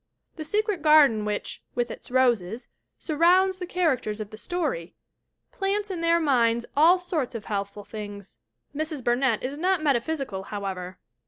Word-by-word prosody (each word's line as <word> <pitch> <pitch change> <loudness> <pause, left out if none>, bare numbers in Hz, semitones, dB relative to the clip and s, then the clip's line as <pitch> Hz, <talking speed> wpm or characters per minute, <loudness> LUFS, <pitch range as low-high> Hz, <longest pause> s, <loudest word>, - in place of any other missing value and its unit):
The 315 - -6
secret 420 +2 -1
garden 290 -9 +5
which, 210 -1 -3
with 240 0 -1
its - - -10
roses, 240 -4 +1 0.3
surrounds 365 +4 +3
the 360 - -5
characters 275 -13 0
of 210 -1 -6
the - - -8
story, 275 - -3 0.6
plants 400 +1 -1
in 350 -3 -4
their 335 0 +3
minds 235 -6 +2
all 325 +5 +6
sorts 335 -9 -3
of 220 - -6
healthful 200 0 -4
thoughts. 205 - -9 0.4
Mrs. 305 -2 -3
Burnett 240 -1 +1
is 275 +3 -4
not 365 -1 +1
metaphysical, 275 -6 0
however. 190 -3 -5
270 Hz, 150 wpm, -26 LUFS, 215-335 Hz, 0.6 s, all